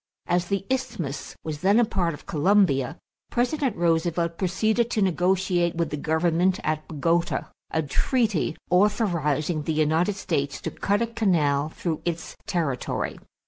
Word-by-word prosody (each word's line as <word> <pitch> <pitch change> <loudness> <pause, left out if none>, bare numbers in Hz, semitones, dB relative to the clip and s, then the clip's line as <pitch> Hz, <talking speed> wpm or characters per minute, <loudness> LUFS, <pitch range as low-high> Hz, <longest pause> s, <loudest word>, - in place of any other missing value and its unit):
As 175 0 +1
the 195 0 -1
isthmus 250 - -3
was 155 -2 -4
then 200 +7 +4
a 240 - +5
part 175 -7 -1
of - - -16
Colombia, 155 -5 +2 0.3
President 250 0 0
Roosevelt 170 0 +1
proceeded 215 +6 +1
to 220 - 0
negotiate 180 -1 +1
with 165 -2 -1
the - - -1
government 165 +4 +1
at 155 0 -1
Bogota 165 +3 0 0.2
a 160 - 0
treaty 215 - 0
authorizing 175 - +2
the 160 +2 -2
United 160 +6 +2
States 145 -8 -2
to - - -3
cut 205 +3 0
a - - +2
canal 160 -11 +1
through 160 -1 -3
its 170 -1 -4
territory. 165 - -2
175 Hz, 140 wpm, -25 LUFS, 155-200 Hz, 0.3 s, a